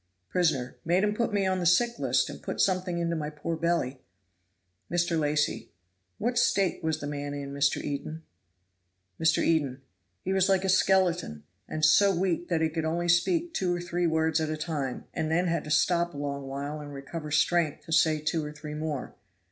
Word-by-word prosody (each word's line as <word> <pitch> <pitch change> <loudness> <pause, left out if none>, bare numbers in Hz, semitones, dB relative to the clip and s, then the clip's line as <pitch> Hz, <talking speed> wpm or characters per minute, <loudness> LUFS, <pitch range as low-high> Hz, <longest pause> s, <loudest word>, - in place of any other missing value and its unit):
Prisoner. 140 -8 0
"Made 175 +4 +2
'em 210 0 +2
put 235 +2 -1
me 200 -2 +1
on 185 0 +1
the 175 - -2
sick 235 +7 +3
list, - - +2
and - - -8
put - - -5
something 185 -2 +1
into 170 0 -1
my 150 -2 -3
poor 150 +2 -4
belly." 160 -6 -1 0.9
Mr. 175 -1 +1
Lacy. 150 -1 0 0.5
"What 240 +2 0
state 195 -8 +1
was 160 -1 0
the 145 - -5
man 145 0 -4
in, 140 -1 -6
Mr. 140 0 +2
Eden?" 155 +3 -5 1.0
Mr. 160 -1 +3
Eden. 140 -5 0 0.4
"He 190 - -1
was 190 0 +3
like 190 -1 +3
a - - 0
skeleton, 180 - +2 0.3
and 155 0 +1
so 195 +6 +5
weak 175 -1 0
that 165 -2 0
he 160 - +2
could 160 0 -3
only 170 +2 -1
speak 330 - +2
two 180 - 0
or - - -3
three 175 0 -1
words 160 0 +1
at 155 - -1
a 155 - -2
time, 150 -5 -3
and 155 - -2
then 175 +3 +2
had 170 -3 -1
to - - -7
stop 170 +2 +2
a - - -6
long 140 -1 -4
while 140 +2 -4
and 145 -1 -8
recover 150 +3 -6
strength 160 0 +1
to - - -9
say 160 -1 +4
two 155 +1 -1
or 150 - -5
three 150 0 -8
more. 150 -3 -4
160 Hz, 200 wpm, -28 LUFS, 150-175 Hz, 1.0 s, so